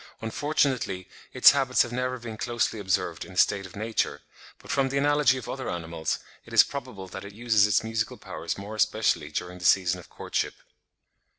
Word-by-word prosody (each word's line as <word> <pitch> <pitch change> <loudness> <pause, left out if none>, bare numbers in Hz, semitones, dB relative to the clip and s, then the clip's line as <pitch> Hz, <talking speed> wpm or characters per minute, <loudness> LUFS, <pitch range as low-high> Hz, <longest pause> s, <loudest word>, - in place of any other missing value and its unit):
Unfortunately, 125 - 0 0.2
its 125 - +8
habits 135 -3 +3
have 120 - -7
never 125 +1 -1
been 115 -2 -7
closely 120 -1 -1
observed 95 -2 -1
in - - -12
a - - -11
state 100 -1 +3
of 90 - -15
nature; 110 +2 -1 0.4
but - - -9
from 135 -1 +2
the 140 - -1
analogy 145 -2 +3
of 125 - -7
other 130 -1 -4
animals, 85 -2 -3 0.3
it - - -13
is - - +8
probable 125 -9 -7
that 95 +1 -8
it 100 0 -9
uses 110 -2 +3
its 105 - +2
musical 110 0 -2
powers - - -5
more 100 +2 -7
especially 110 -8 +1
during 90 +4 -5
the - - -10
season 90 0 +3
of 90 - -14
courtship. - - -3
110 Hz, 190 wpm, -27 LUFS, 95-130 Hz, 0.4 s, its